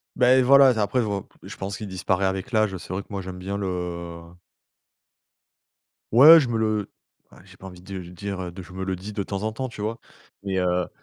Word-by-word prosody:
Beh, 130 +1 +5
voilà. 135 +1 +7
Après, 125 +5 0
heu, - - +2
v 100 -2 -2 0.3
je - - -8
pense 95 +1 -5
qu'il 105 - -7
disparaît 95 +1 -1
avec 95 +6 -2
l'âge. 110 -4 +1
C'est - - -12
vrai 100 - -2
que - - -31
moi, 100 -1 -4
j'aime 90 0 -8
bien 100 +2 -4
le 90 -3 -4 1.9
Ouais, 155 +7 +9
je 135 - 0
me 115 -1 -1
le 110 -2 -1 0.5
j'ai 95 -1 -17
pas 95 - -10
envie 90 -1 -12
du 95 0 -7
de 85 - -12
dire 95 0 -6
de 95 +1 -9
je 90 0 -14
me 95 0 -5
le 95 0 -2
dis 100 +4 -9
de 100 - -2
temps 100 +1 -4
en 110 - -1
temps, 130 +3 -5
tu 110 - -13
vois, 115 +2 -3 0.4
mais 95 -1 -3
heu 90 -1 0
100 Hz, 225 wpm, -24 LUFS, 95-110 Hz, 1.9 s, Ouais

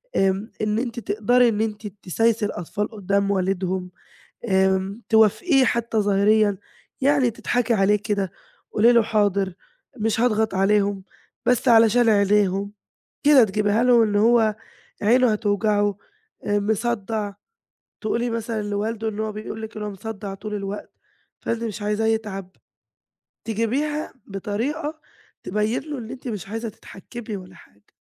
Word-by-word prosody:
آمم، 195 +3 +1
إن 215 +1 0
أنتِ 240 -1 -3
تقدري 235 +4 +3
إن 215 -1 -1
أنتِ 210 -1 -3
تسايسي 210 +3 0
الأطفال 205 +3 -3
قدّام 200 -1 0
والدهم، 185 -1 -1 0.6
آمم، 190 +2 +1
توافقيه 255 - +4
حتى 235 -2 -1
ظاهريًا 205 0 +3 0.4
يعني 275 -2 +3
تضحكي 240 +1 0
عليه 200 0 +3
كده. 200 -3 -1 0.4
قولي 230 +3 +5
له 235 -2 +5
"حاضر 200 -4 +1 0.4
مش 225 +1 0
هاضغط 220 -4 +1
عليهم 200 0 +2 0.4
بس 250 +1 +2
علشان 230 0 +5
عينيهم." 200 -1 +2 0.5
كده 285 -4 +7
تجبيها 210 +2 +1
له 245 -2 +5
اللي 205 -1 +1
هو 225 -1 +4 0.5
عينه 240 +3 +4
هتوجعه، 205 -1 +1 0.5
آآ، 205 0 +1
مصدع. 215 -1 -1 0.7
تقولي 235 +2 -1
مثلًا 230 -1 -3
لوالده 215 +2 -2
إن 210 -1 -7
هو 220 0 -1
بيقول 215 +1 -7
لِك 220 0 -8
إن 210 - -4
هو 210 - -3
مصدع 200 0 -6
طول 210 +2 -6
الوقت، 200 0 -5 0.5
فأنتِ 230 0 -2
مش 215 -2 -4
عايزاه 210 +2 0
يتعب. 210 -4 -2 0.9
تجيبيها 260 +8 -1
بطريقة 280 - -4 0.4
تبين 210 +4 -1
له 300 -3 -6
إن 225 -2 -7
أنتِ 260 - -8
مش 210 -5 -5
عايزة 225 +2 -4
تتحكمي 215 +1 -9
والّا 185 0 -12
حاجة. 105 -10 -21
215 Hz, 135 wpm, -23 LUFS, 200-230 Hz, 0.9 s, كده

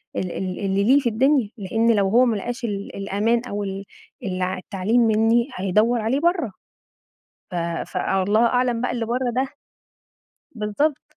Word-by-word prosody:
ال 180 -2 -2
ال 185 -1 -4
اللي 195 0 0
ليه 260 +7 +5
في 250 -4 0
الدنيا، 260 0 +2
لإن 225 +3 +1
لو 200 -1 +2
هو 245 +4 +5
ما 235 -3 +1
لقاش 245 +5 -5
ال 200 -2 -4
الأمان 205 +4 0
أو 205 -2 -3
ال 195 0 -5 0.4
ال 185 -2 -3
التعليم 190 +5 0
مني 225 +2 +3
هيدوّر 215 +5 +2
عليه 235 +6 0
برّا. 340 - +1 1.0
ف - - -5 0.4
ف - - -4
الله 205 +4 +2
أعلم 245 -1 +1
بقى 250 - 0
اللي 235 -2 -2
برّا 245 +2 -1
ده، 260 +1 +1 1.1
بالضبط، 230 +8 -1
225 Hz, 160 wpm, -22 LUFS, 195-245 Hz, 1.1 s, ليه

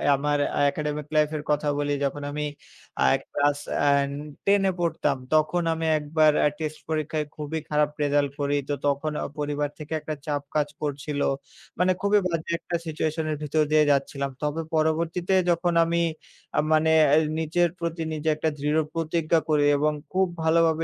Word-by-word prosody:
আমার 145 +1 0 0.3
academic 150 0 -3
life 150 -1 +4
এর 150 - -6
কথা 150 0 0
বলি, 145 0 0
যখন 145 +1 -3
আমি 150 +1 -3 0.6
আ - - +5 0.3
ক্লাস 145 0 +1 0.2
অ্যান 140 -1 +3 0.4
10 200 0 +4
এ - - +1
পড়তাম, 165 -5 0 0.2
তখন 155 +3 +2
আমি 160 0 -3
একবার 155 +1 +3
অ্যা - - +4
টেস্ট 155 -1 -4
পরীক্ষায় 155 -1 -1
খুবই 155 +1 -4
খারাপ 150 0 +2
রেজাল্ট 145 -1 +2
করি। 145 0 +1
তো - - +1
তখন 145 +2 0
অ - - -3
পরিবার 145 0 -1
থেকে 150 0 -6
একটা 155 - -4
চাপ 145 -1 -1
কাজ 150 -1 +2
করছিল। 145 0 -3 0.6
মানে 180 +1 +4
খুবই 200 +1 +4
বাজে 165 -2 -3
একটা 175 - -4
সিচুয়েশন 160 0 -2
এর 150 - -2
ভিতর 155 +1 +2
দিয়ে 155 0 +5
যাচ্ছিলাম। 140 0 0
তবে 150 +2 -1
পরবর্তীতে 165 +3 0 0.2
যখন 175 +1 +1
আমি 170 +1 0 0.6
আ - - +5
মানে 155 +1 +3 0.2
অ্যা 145 +2 +5 0.2
নিচের 170 +2 +2
প্রতি 165 -1 -3
নিজে 155 +1 -1
একটা 155 +1 0
দৃঢ় 150 +2 +1
প্রতিজ্ঞা 165 0 +1
করি 150 -1 +3
এবং 150 +1 +2 0.2
খুব 190 0 +3 0.2
ভালো 160 +1 +4
ভাবে 160 0 0
155 Hz, 175 wpm, -25 LUFS, 145-160 Hz, 0.6 s, আ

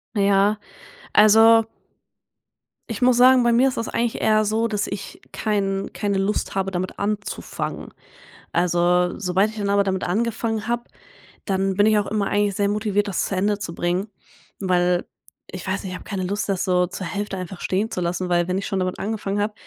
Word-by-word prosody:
Na 205 - +1
ja, 195 0 +4 0.7
also 225 +2 +7 1.3
ich 225 0 -5
muss 250 -1 +4
sagen, 255 +1 +7
bei 240 0 +3
mir 245 +3 +4
ist 260 - -2
das 230 - -2
eigentlich 235 -1 -1
eher 215 0 +3
so, 220 +2 +1
dass 210 -2 -1
ich 200 - -7
kein 195 -2 -1
keine 200 -2 -1
Lust 195 +2 -1
habe, 195 0 -1
damit 185 0 -4
anzufangen. 205 0 -4 0.6
Also, 175 +1 +2
sobald 190 +2 +1
ich 220 - -11
dann 200 -1 -1
aber 200 0 +3
damit 190 -1 -2
angefangen 225 +2 -1
habe, 240 0 -1 0.6
dann 195 -1 0
bin 205 +2 +4
ich 215 -1 +4
auch 205 - -2
immer 210 -2 -1
eigentlich 205 -1 +1
sehr 200 0 +1
motiviert, 205 0 0
das 195 - -1
zu 195 - -3
Ende 205 +2 0
zu 170 -4 -6
bringen, 180 +4 -1 0.5
weil 180 -2 +1 0.5
ich 185 0 -7
weiß 190 +1 -2
nicht, 190 - -5
ich - - -5
habe - - -15
keine 195 -3 -2
Lust, 200 +2 -2
das 190 -2 0
so 180 -1 +2
zur 185 +1 -6
Hälfte 200 +2 -4
einfach 185 0 -7
stehen 205 +5 -1
zu 180 - -3
lassen, 180 +1 -2
weil 175 -1 +2
wenn 185 +1 -1
ich 200 - -3
schon 195 - -2
damit 185 0 -2
angefangen 205 -1 -3
habe, 210 +1 -1
200 Hz, 200 wpm, -22 LUFS, 185-215 Hz, 1.3 s, also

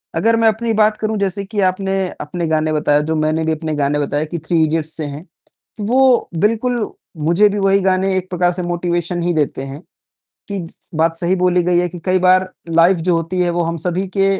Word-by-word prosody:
अगर 230 +1 +2
मैं 225 0 +3
अपनी 225 +1 -1
बात 215 0 +3
करूँ 215 0 -2
जैसे 200 0 -1
कि 205 +1 -4
आपने, 190 0 -2
अपने 170 +2 -3
गाने 155 0 0
बताया 150 -1 +2
जो 160 - +1
मैंने 155 +1 0
भी 160 - +1
अपने 155 -1 -3
गाने 145 0 0
बताया, 145 +2 -1
कि 170 +2 -5
थ्री 160 +1 0
इडियट्स 155 0 0
से 155 - -3
हैं, 145 +3 -7
त - - -42 0.5
वो 255 +3 +3
बिल्कुल, 230 +2 0 0.3
मुझे 170 +7 +3
भी 205 0 -2
वही 195 0 +3
गाने 190 0 +1
एक 185 0 -4
प्रकार 180 0 +1
से 180 +1 -4
मोटिवेशन 175 0 -2
ही 175 0 +1
देते 145 -3 -1
हैं, 135 +3 -7 0.7
कि 190 -4 -4 0.3
बात 165 +1 +1
सही 175 +2 +1
बोली 180 0 +2
गई 175 0 +2
है 180 0 +1
कि 175 +1 -9
कई 185 0 +2
बार 185 +1 +3 0.2
लाइफ़ 170 +2 +4
जो 175 - +4
होती 170 +3 -2
है 175 - +1
वो 170 0 0
हम 170 0 -2
सभी 180 +4 -1
के 195 0 +3
175 Hz, 220 wpm, -18 LUFS, 160-195 Hz, 0.7 s, लाइफ़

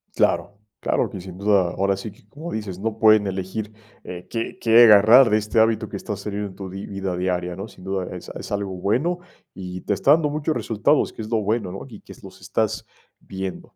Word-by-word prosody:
Claro, 100 - +1 0.2
claro - - 0
que 95 - -7
sin 90 0 -10
duda, 100 -3 +2
ahora 100 +1 0
sí 100 +3 -7
que 100 - -23
cómo 155 +10 -8
dices, 100 -4 -5
no 110 +1 -3
pueden 110 -2 +5
elegir, 95 +3 -4 0.3
eh, 90 0 -8
qué 115 -1 -4
qué 115 +1 +6
agarrar 115 +3 +8
de 105 - +4
este 105 +1 0
hábito 110 -1 +2
que 100 - -6
estás 100 0 -6
teniendo 105 0 -3
en 95 - -12
tu 95 -1 -7
di 95 +2 -7
vida 95 -2 -3
diaria, 90 -1 -2
¿no? 100 +4 -6
Sin 95 - -16
duda 95 -1 -3
es - - -9
es - - -8
algo 100 -1 -2
bueno 130 - 0 0.3
y 90 -1 -7
te - - -1
está 100 +8 +2
dando 150 -1 +4
muchos 155 +1 -2
resultados, 115 +7 +1
que - - -8
es 110 - -7
lo 115 - +1
bueno, 105 -2 -1
¿no? 95 - -7
Y 110 -6 -12
que - - -15
s - - -19
los - - -13
estás - - -1 0.3
viendo. 95 -1 -7
100 Hz, 225 wpm, -23 LUFS, 95-110 Hz, 0.3 s, agarrar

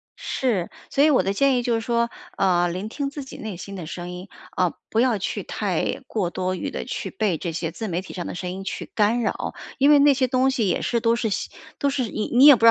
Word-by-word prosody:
是， 220 -10 -1 0.2
所 280 - +3
以 310 - +6
我 270 - +5
的 195 - -1
建 275 +5 +3
议 - - +1
就 240 -1 +1
是 225 - -1
说， 235 0 +1 0.3
呃， 175 -2 +3
聆 185 +5 -4
听 275 +4 -3
自 285 -1 -6
己 265 - -10
内 215 -3 -5
心 195 +3 -8
的 180 -4 -6
声 175 +2 -6
音， 180 +2 -7 0.3
啊， 180 -2 +2 0.2
不 220 - +1
要 240 -4 +3
去 190 - -3
太 - - -1
过 185 -6 -1
多 185 0 -1
于 - - -4
的 - - -4
去 - - -4
被 205 - 0
这 170 +2 -3
些 165 0 -3
自 220 +6 -5
媒 180 -2 -1
体 190 - -10
上 175 - -4
的 - - -5
声 180 0 -4
音 190 +1 -6
去 - - -5
干 220 +3 +3
扰， 220 - -2 0.2
因 280 +2 +5
为 295 - +7
那 285 -1 +6
些 260 -1 +2
东 255 +1 +3
西 240 -6 +1
也 180 - +1
是 235 - +1
都 230 0 +3
是 235 -1 -1 0.5
都 280 - +1
是 255 -5 -1
你 215 - -2
你 260 +3 +8
也 290 - +11
不 225 - -7
知 - - +9
220 Hz, 285 characters per minute, -24 LUFS, 185-255 Hz, 0.5 s, 也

